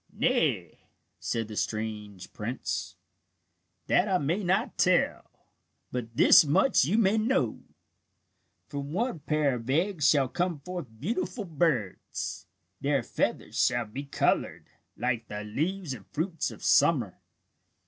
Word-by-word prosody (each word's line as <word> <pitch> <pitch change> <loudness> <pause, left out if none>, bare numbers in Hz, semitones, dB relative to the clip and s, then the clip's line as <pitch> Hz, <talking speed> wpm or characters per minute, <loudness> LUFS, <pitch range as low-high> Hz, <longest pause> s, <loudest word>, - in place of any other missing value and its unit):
"Nay," - - 0 0.4
said 115 -2 -2
the 110 - -8
strange 105 -3 -4
prince, 120 +5 -4 0.9
"that 180 - +3
I 190 -2 +2
may 175 +6 -1
not 190 +6 +1
tell. 180 0 +2 0.6
But 115 -2 -5
this - - +8
much 150 - +3
you 185 +9 +1
may 220 0 +3
know: 260 +5 +1 1.1
"From 140 0 -5
one 225 -2 -1
pair 150 -2 +1
of 120 0 -6
eggs 165 +2 +2
shall 140 -3 +4
come 175 +2 -2
forth 180 -2 -6
beautiful 220 - -2
birds. 150 - -2 0.3
Their - - +1
feathers - - -1
shall 120 -1 +2
be 130 +7 -7
coloured, 140 - 0 0.3
like 120 -2 -1
the 105 0 -5
leaves 160 - -2
and 110 -6 -11
fruits 165 +1 -2
of - - -11
summer. - - +3
145 Hz, 130 wpm, -28 LUFS, 120-185 Hz, 1.1 s, this